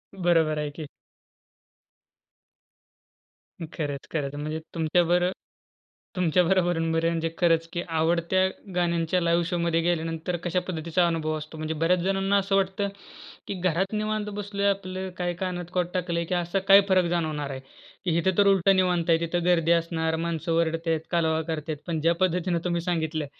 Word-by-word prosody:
बरोबर 165 Hz, -4 st, +2 dB
आहे 150 Hz, -1 st, -2 dB
की. 155 Hz, -2 st, -7 dB, 2.9 s
खरंच, 145 Hz, -4 st, -4 dB
खरंच. 145 Hz, -3 st, -2 dB
म्हणजे 155 Hz, +2 st, -4 dB, 0.2 s
तुमच्याबर 175 Hz, +2 st, +2 dB, 0.9 s
तुमच्या 180 Hz, -1 st, +3 dB
बरोबर 175 Hz, -2 st, +1 dB
म्हणजे 165 Hz, 0 st, 0 dB
खरंच, 165 Hz, -2 st, +2 dB
की 175 Hz, -, -1 dB
आवडत्या 170 Hz, +3 st, +2 dB, 0.3 s
गाण्यांच्या 170 Hz, 0 st, +1 dB
लाईव्ह 170 Hz, 0 st, +2 dB
शोमध्ये 170 Hz, -2 st, +1 dB
गेल्यानंतर, 165 Hz, 0 st, -1 dB
कशा 180 Hz, +1 st, 0 dB
पद्धतीचा 170 Hz, 0 st, 0 dB
अनुभव 155 Hz, -2 st, -1 dB
असतो. 155 Hz, +1 st, -9 dB
म्हणजे 155 Hz, 0 st, -3 dB
बऱ्याच 165 Hz, +3 st, +2 dB
जणांना 195 Hz, +1 st, +1 dB
असं 195 Hz, 0 st, +1 dB
वाटतं, 195 Hz, +1 st, +1 dB, 0.6 s
की -, -, -3 dB
घरात 185 Hz, +3 st, 0 dB
निवांत 215 Hz, 0 st, -1 dB
बसलो, 200 Hz, 0 st, -4 dB
आपलं 190 Hz, -1 st, -3 dB
काही 175 Hz, -1 st, -1 dB
कानात 180 Hz, -1 st, -3 dB
कॉड 180 Hz, -1 st, +1 dB
टाकलंय, 170 Hz, -2 st, -1 dB
की 180 Hz, -, -1 dB
असा 175 Hz, +2 st, 0 dB
काय 195 Hz, +1 st, +9 dB
फरक 185 Hz, -1 st, +4 dB
जाणवणार 155 Hz, -4 st, -1 dB
आहे? 130 Hz, -1 st, -6 dB, 0.6 s
इथे 190 Hz, +3 st, +2 dB
तर 200 Hz, -1 st, +5 dB
उलट 195 Hz, -1 st, +4 dB
निवांत 180 Hz, -2 st, +1 dB
आहे. 165 Hz, -1 st, +5 dB
तिथे 170 Hz, +1 st, -1 dB
गर्दी 165 Hz, -2 st, +3 dB
असणार, 165 Hz, -1 st, +1 dB
माणसं 165 Hz, 0 st, -2 dB
ओरडतात, 165 Hz, 0 st, +1 dB
कालवा 160 Hz, -2 st, +1 dB
करतात 155 Hz, -1 st, -3 dB
पण 165 Hz, -2 st, -1 dB
ज्या 165 Hz, +2 st, +3 dB
पद्धतीने 180 Hz, -1 st, +1 dB
तुम्ही 170 Hz, -1 st, 0 dB
सांगितलं, 160 Hz, -3 st, -1 dB
170 Hz, 150 wpm, -26 LUFS, 160-180 Hz, 2.9 s, काय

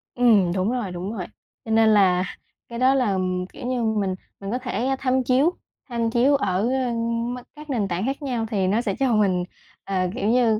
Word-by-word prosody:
Ừm, 220 Hz, -8 st, +4 dB
đúng 190 Hz, +4 st, 0 dB
rồi, 240 Hz, -7 st, -2 dB
đúng 180 Hz, +4 st, -5 dB
rồi. 190 Hz, -6 st, -4 dB, 0.4 s
Cho 225 Hz, -, -4 dB
nên 220 Hz, 0 st, +5 dB
là 190 Hz, -4 st, +4 dB, 0.5 s
cái 235 Hz, -1 st, -6 dB
đó 260 Hz, +1 st, +5 dB
là, 255 Hz, -6 st, +2 dB
ừm, 185 Hz, -1 st, -1 dB
kiểu -, -, -10 dB
như, 250 Hz, -2 st, -1 dB
mình 210 Hz, -4 st, 0 dB, 0.2 s
mình 195 Hz, 0 st, -5 dB
có 245 Hz, -, 0 dB
thể 250 Hz, +1 st, -1 dB
tham 260 Hz, 0 st, +1 dB
chiếu 265 Hz, +7 st, +3 dB, 0.4 s
tham 230 Hz, -2 st, 0 dB
chiếu 255 Hz, +5 st, +4 dB
ở, 275 Hz, -, 0 dB, 0.2 s
ơ, 260 Hz, -1 st, 0 dB
m 230 Hz, +1 st, -1 dB, 0.2 s
các 300 Hz, 0 st, -12 dB
nền 225 Hz, -7 st, 0 dB
tảng 180 Hz, +2 st, -2 dB
khác 270 Hz, +3 st, -2 dB
nhau 245 Hz, -5 st, -2 dB
thì 195 Hz, -3 st, +1 dB
nó 210 Hz, +5 st, +2 dB
sẽ 200 Hz, -5 st, -2 dB
cho 265 Hz, -3 st, +2 dB
mình, 195 Hz, -4 st, +2 dB, 0.4 s
à, 185 Hz, -2 st, 0 dB
kiểu 210 Hz, -, -1 dB
như, 230 Hz, -2 st, +3 dB
230 Hz, 215 wpm, -23 LUFS, 195-250 Hz, 0.5 s, nên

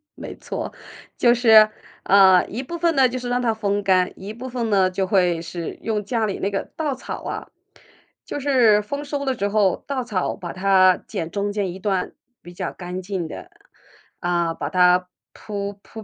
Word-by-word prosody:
没 -, -, -8 dB
错， -, -, -6 dB, 0.4 s
就 240 Hz, -1 st, +5 dB
是 220 Hz, -3 st, +7 dB, 0.3 s
呃， 190 Hz, -2 st, +6 dB
一 230 Hz, -, -5 dB
部 340 Hz, +6 st, -6 dB
分 335 Hz, 0 st, +2 dB
呢， 265 Hz, -1 st, +6 dB
就 250 Hz, +1 st, -4 dB
是 245 Hz, -1 st, -5 dB
让 245 Hz, 0 st, 0 dB
它 230 Hz, -2 st, +1 dB
风 205 Hz, -1 st, -1 dB
干， 185 Hz, -2 st, +3 dB
一 200 Hz, +3 st, -7 dB
部 255 Hz, +3 st, -7 dB
分 240 Hz, -2 st, -2 dB
呢， 190 Hz, -3 st, +3 dB
就 190 Hz, +1 st, -1 dB
会 180 Hz, -4 st, +2 dB
是 170 Hz, 0 st, -6 dB
用 215 Hz, -2 st, -2 dB
家 230 Hz, 0 st, -1 dB
里 200 Hz, -, -3 dB
那 200 Hz, -, -1 dB
个 195 Hz, -, -3 dB
稻 305 Hz, -3 st, -1 dB
草 -, -, -7 dB
啊， -, -, -5 dB, 0.8 s
就 -, -, -5 dB
是 250 Hz, -7 st, +4 dB
丰 285 Hz, +7 st, -5 dB
收 285 Hz, -1 st, -3 dB
了 265 Hz, -1 st, 0 dB
之 200 Hz, -5 st, -2 dB
后， 205 Hz, -2 st, +1 dB
稻 270 Hz, -3 st, -2 dB
草 195 Hz, -6 st, -2 dB
把 175 Hz, -4 st, -7 dB
它 185 Hz, -1 st, +4 dB
剪 165 Hz, 0 st, -4 dB
中 205 Hz, 0 st, -2 dB
间 200 Hz, -3 st, -1 dB
一 190 Hz, -, -9 dB
段， 190 Hz, -2 st, -1 dB, 0.3 s
比 175 Hz, -, -12 dB
较 -, -, -4 dB
干 180 Hz, 0 st, -6 dB
净 185 Hz, -3 st, -4 dB
的， -, -, -9 dB, 0.7 s
啊， 170 Hz, -1 st, 0 dB
把 145 Hz, -, -5 dB
它 180 Hz, +1 st, +4 dB, 0.2 s
铺 200 Hz, -1 st, -6 dB
铺 220 Hz, -1 st, -11 dB
200 Hz, 210 characters per minute, -22 LUFS, 185-240 Hz, 0.8 s, 是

